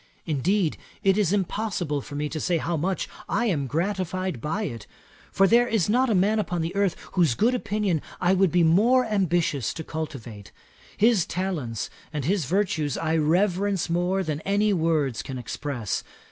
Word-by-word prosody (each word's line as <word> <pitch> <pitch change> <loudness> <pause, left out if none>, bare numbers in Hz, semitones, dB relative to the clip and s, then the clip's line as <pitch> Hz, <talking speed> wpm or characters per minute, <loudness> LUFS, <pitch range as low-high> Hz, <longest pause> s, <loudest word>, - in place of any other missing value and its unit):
Indeed 170 +3 +1 0.3
it 195 -1 +4
is 200 -4 +2
impossible 190 -6 -1
for 145 - -9
me 150 +1 -1
to 155 - -4
say 170 +2 +1
how 170 +2 -2
much 180 +5 -1 0.2
I 235 +4 +1
am 150 - 0
gratified 185 - -2
by 165 - -2
it; 115 - -6 0.4
for 195 - +4
there 240 +3 +5
is 215 -6 +1
not 255 +4 +3
a 220 - +2
man 205 +4 +3
upon 175 -5 -1
earth 200 -3 +1 0.2
whose 170 -10 +2
good 235 - +2
opinion 210 - 0 0.2
I 180 +1 +3
would 190 -2 +3
be 175 -1 +3
more 225 +10 +4
ambitious 175 - 0
to 160 - -5
cultivate. 130 -11 -7 0.5
His 215 -3 +3
talents 160 - -3 0.2
and 150 -4 -3
his 185 -1 +1
virtues 160 -4 0
I 160 0 0
reverence 180 +3 +1
more 180 +3 +1
than 155 -3 -3
any 205 +2 +2
words 160 -8 +1
can 130 - -6
express. 125 -2 -3
175 Hz, 170 wpm, -25 LUFS, 150-200 Hz, 0.5 s, there